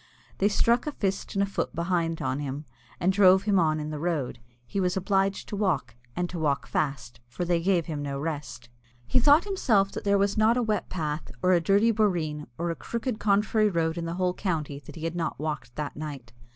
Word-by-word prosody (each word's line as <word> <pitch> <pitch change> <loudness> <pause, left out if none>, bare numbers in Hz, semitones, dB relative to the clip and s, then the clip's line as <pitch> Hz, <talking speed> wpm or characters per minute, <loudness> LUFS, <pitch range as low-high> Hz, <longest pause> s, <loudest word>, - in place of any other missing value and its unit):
They 195 - +4
struck 235 +5 +2
a 300 - -2
fist 195 -4 -2
and 195 - +3
a - - +2
foot 200 - -3
behind 170 -1 -1
on 130 +1 -1
him, 145 +1 -4 0.3
and 185 +2 +2
drove 190 -1 +6
him 200 -2 +3
on 155 -2 +2
in 150 0 -4
the 150 - -4
road. 155 -7 -2 0.3
He 195 - -3
was 180 0 +1
obliged 195 +1 0
to - - -3
walk, 170 - 0 0.2
and 180 0 -1
to 175 - -4
walk 145 -3 0
fast, 135 -4 -2
for 120 +9 -4
they 170 -1 +1
gave 175 -2 +2
him 150 -3 -4
no 140 -1 -3
rest. 145 -6 -5 0.4
He 185 - +3
thought 290 +6 +6
himself 225 - +2
that - - -6
there 200 0 +3
was 200 +1 +1
not 225 +3 +4
a 250 - +2
wet 215 -2 -1
path, 155 -5 -3
or 185 - +4
a 175 - +4
dirty 200 +6 +4
boreen, 170 -9 0
or 170 +1 -1
a - - -3
crooked 235 +3 -4
contrary 215 +1 +3
road 165 -3 0
in 170 -1 -3
the 165 +1 -3
whole 180 0 +1
county, 155 -8 -2
that 145 - -12
he 160 - -8
had 165 +1 -2
not 165 -2 -2
walked 150 -5 -4
that 150 -1 -4
night. 140 -6 -7
175 Hz, 225 wpm, -27 LUFS, 150-200 Hz, 0.4 s, drove